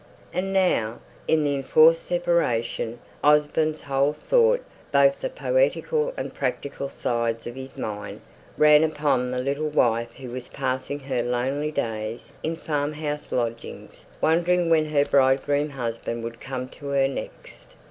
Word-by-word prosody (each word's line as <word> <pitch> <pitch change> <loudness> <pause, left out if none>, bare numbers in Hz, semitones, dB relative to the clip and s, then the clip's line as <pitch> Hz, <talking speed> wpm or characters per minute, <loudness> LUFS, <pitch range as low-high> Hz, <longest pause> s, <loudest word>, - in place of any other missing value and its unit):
And 190 +1 -1
now, 180 - +1 0.3
in 160 -1 +3
the 145 -1 +1
enforced 475 - +5
separation, - - 0 0.3
Osborne's 150 +1 +3
whole 140 +1 +1
thought, 485 - +2 0.3
both 140 -1 +4
the - - -2
poetical - - +1
and - - -4
practical 140 -1 -3
sides 115 -3 -2
of 120 - -5
his 130 +1 -9
mind, 105 -1 -5 0.4
ran 150 0 +6
upon 145 -5 +1
the 125 - -3
little 140 +4 -1
wife 115 -5 +1
who 130 -1 -9
was 125 0 -6
passing 130 +2 -3
her 130 -3 -1
lonely 130 +5 -1
days 115 -5 -4
in 165 +1 -2
farmhouse 150 -1 -3
lodgings, 115 -1 -4 0.2
wondering 170 +1 +2
when 155 -1 +4
her 145 -2 +2
bridegroom 140 +2 +2
husband 115 -3 -4
would 115 0 -7
come 130 -1 -4
to 145 - -10
her 140 -1 +2
next. 135 - -9
140 Hz, 140 wpm, -25 LUFS, 125-155 Hz, 0.4 s, ran